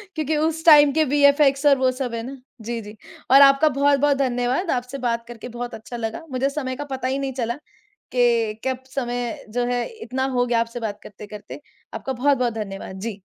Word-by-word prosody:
क्योंकि 310 0 -1
उस 320 +1 -1
टाइम 295 -3 +8
के 315 - +3
वीएफ़एक्स 285 0 +3
और 280 -2 +6
वो 260 0 +2
सब 255 -2 -4
है 230 - -3
ना, 270 +2 -7 0.2
जी, 235 +1 -4
जी। 210 +1 -11 0.4
और 275 +1 +9
आपका 275 +3 +6
बहुत-बहुत 280 0 +2
धन्यवाद, 255 +6 0
आपसे 250 +2 -3
बात 235 -2 -2
करके 240 +1 -9
बहुत 240 0 -6
अच्छा 225 +2 -8
लगा। 225 +8 -5
मुझे 260 +2 0
समय 265 -3 -4
का 290 - -5
पता 260 -1 -3
ही 270 +1 -1
नहीं 270 -1 -3
चला 240 -1 -2 0.6
कि 235 -3 +2
कब 260 0 -2
समय 245 -3 -3
जो 245 +2 -1
है, 245 0 0
इतना 265 - -4
हो 245 0 +2
गया 235 -1 +1
आपसे 230 +1 -4
बात 210 -2 -4
करते-करते। 210 +5 -10 0.3
आपका 265 - -4
बहुत-बहुत 255 -2 +1
धन्यवाद। 195 -3 -6
जी। 210 -2 -5
255 Hz, 200 wpm, -22 LUFS, 235-280 Hz, 0.6 s, और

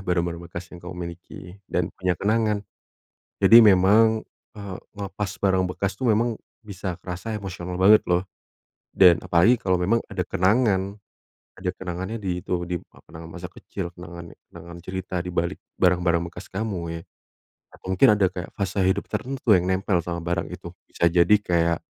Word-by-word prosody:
barang-barang 85 -2 -1
bekas 85 0 -8
yang 90 - -10
kamu 90 +1 -8
miliki 85 +1 -10 0.2
dan 90 -1 -1
punya 90 -2 -1
kenangan. 105 0 0 0.8
Jadi 115 +1 +9
memang, 110 +2 +5 0.3
eee, 100 -3 -7 0.2
ngelepas 100 0 -4
barang 95 -1 +3
bekas 100 -1 -1
tuh 130 - 0
memang 115 +1 +1 0.2
bisa 95 -3 -5
kerasa 95 +5 -5
emosional 90 -3 -6
banget 100 +4 +7
loh. 90 +1 +2 0.7
Dan 90 -3 +7
apalagi 105 +8 +3
kalau 95 -1 +1
memang 95 +6 +2
ada 95 -3 -3
kenangan, 100 +1 +1 0.6
ada 90 - -3
kenangannya 95 +4 -5
di 90 -4 -3
itu, 85 -1 -2
di 90 - -2 0.2
apa - - -21
namanya, 80 0 -9
masa 90 - -6
kecil 90 0 -7
kenangannya, 85 -1 -10 0.2
kenangan 85 0 -11
cerita 95 0 -5
di 90 - -5
balik 85 0 -1 0.2
barang-barang 85 -1 +2
bekas 90 +2 -11
kamu 95 -5 -3
ya. - - -10 0.7
Nah, - - -16
mungkin 95 -1 +5
ada 105 -2 +3 0.3
fase 100 0 -3
hidup 95 - 0
tertentu 130 -1 -4
yang 90 - -1
nempel 95 0 +1
sama 85 -1 -3
barang 85 +1 -2
itu. - - -8 0.2
Bisa 85 - +1
jadi 85 +4 +5
kayak 85 -3 +1
95 Hz, 160 wpm, -24 LUFS, 85-100 Hz, 0.8 s, Jadi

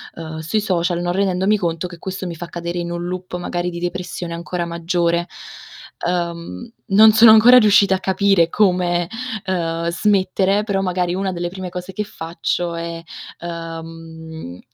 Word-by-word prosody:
uhm, 160 -1 -7
sui 190 +7 -1
social, 175 -3 0
non 175 0 -1
rendendomi 195 +2 +1
conto 170 -1 -2
che 175 -2 -12
questo 190 0 -5
mi 170 -2 -5
fa 175 - -6
cadere 170 +1 -4
in 170 0 -3
un 175 0 -4
loop 180 0 -5
magari 175 0 -2
di 170 -1 -6
depressione 175 -1 -4
ancora 170 +1 -3
maggiore. 170 0 0 0.8
Uhm, 175 +6 -3 0.2
non 215 +1 +7
sono 220 +1 +8
ancora 235 +3 +8
riuscita 205 -4 +5
a - - -3
capire 190 -2 +3
come, 180 -3 +1 0.4
uhm, 170 -2 -1
smettere, 195 +1 +1
però 200 -3 -1
magari 180 -1 -1
una 190 0 -2
delle 175 0 -3
prime 185 0 -6
cose 180 +1 -7
che 210 +3 -3
faccio 170 -1 -3
è, 170 0 -5 0.4
uhm 175 - -5
mhmm, 165 - -8
175 Hz, 165 wpm, -20 LUFS, 170-190 Hz, 0.8 s, sono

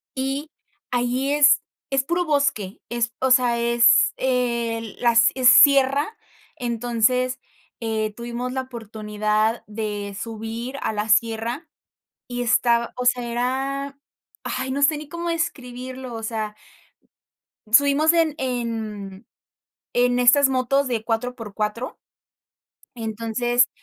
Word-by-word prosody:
y 270 +3 -3 0.4
allí 250 +3 0
es 290 0 +5 0.3
es 270 -1 0
puro 345 +4 0
bosque, 275 - 0
es 235 -1 -1
o 260 0 +1
sea, 245 -2 +4
es, 235 0 +4
el 235 -4 -1
las, 235 -1 +5
eh, 260 - -4
sierra, 280 - +6 0.4
entonces, 245 +1 0 0.4
eh 220 -2 -2
tuvimos 240 +2 -5
la 260 - -1
oportunidad 215 -2 -2
de 210 -2 -5
subir 230 +4 -6
a - - -1
la 210 +1 -3
sierra 230 +7 +1 0.6
y 245 0 -4
estaba, 235 -1 +2
o 250 - -3
sea, 245 0 +2
era, 265 +4 -2 0.5
ay, 260 +1 -3
no 280 +1 -2
sé 300 +1 +4
ni 300 -1 -9
cómo 340 +1 -5
describirlo, 255 -6 -4
o 225 - -6
sea 215 -2 -3 1.1
Subimos 285 +6 +5
en 330 -2 +2
en, 230 -5 -3
mm, 215 - -20 0.7
en 245 0 +2
estas 260 +3 +5
motos 265 +1 +1
de 230 -3 -2
4 235 +2 -2
por 220 -5 -9
4. 215 +4 -3 1.0
Entonces, 230 +2 0
245 Hz, 125 wpm, -23 LUFS, 225-265 Hz, 1.1 s, sierra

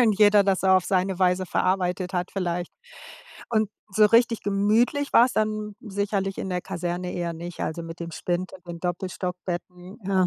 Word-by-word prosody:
Und 220 -5 +3
jeder 205 -1 +7
das 195 -1 +1
auf 185 -1 +5
seine 190 -1 0
Weise 185 0 +2
verarbeitet 185 0 0
hat 180 0 -1
vielleicht. 175 -2 -2 0.8
Und 215 -2 +2 0.3
so 215 -1 +7
richtig 230 +1 +4
gemütlich 220 +8 +2
war's 240 +2 +6
dann 215 -1 -1
sicherlich 200 -3 -2
in - - -3
der 180 -1 -1
Kaserne 175 +1 -3
eher 170 -1 -2
nicht, 170 +1 -8
also, 165 +2 -3
mit 165 +1 -9
dem 170 0 -5
Spind 180 +3 -2
und 185 -1 -15
den 170 -1 -6
Doppelstockbetten. 180 +1 -4
Ja. 190 -2 +3
185 Hz, 170 wpm, -25 LUFS, 180-205 Hz, 0.8 s, jeder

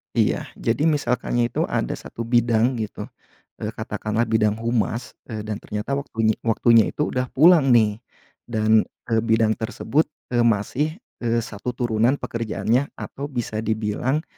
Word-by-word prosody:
Iya, - - +1
jadi 145 +8 0
misalkannya 120 -4 0
itu - - 0
ada - - -1
1 115 - -6
bidang 120 +1 +2
gitu, 110 -2 -4 0.6
eee, - - -3
katakanlah 110 +2 -2
bidang 110 -2 +2
humas, 115 0 -1 0.2
eee, 110 -3 -5
dan 105 -1 -4
ternyata 105 +5 -5
waktunye 110 -5 -1
waktunya 115 0 +4
itu 150 - -2
udah 125 0 -1
pulang 160 -1 +6
nih 110 -2 +3 0.5
dan, 110 -1 +3 0.2
eee, 115 - +4
bidang 110 -1 +2
tersebut, 140 +7 0 0.2
eee, 120 - +1
masih, 120 +7 +1 0.2
eee, 115 -1 0
1 115 +4 -5
turunan 120 +1 +2
pekerjaannya 115 +1 -1
atau 140 +1 -6
bisa 120 -5 -3
dibilang 110 +7 -1
115 Hz, 140 wpm, -23 LUFS, 110-125 Hz, 0.6 s, pulang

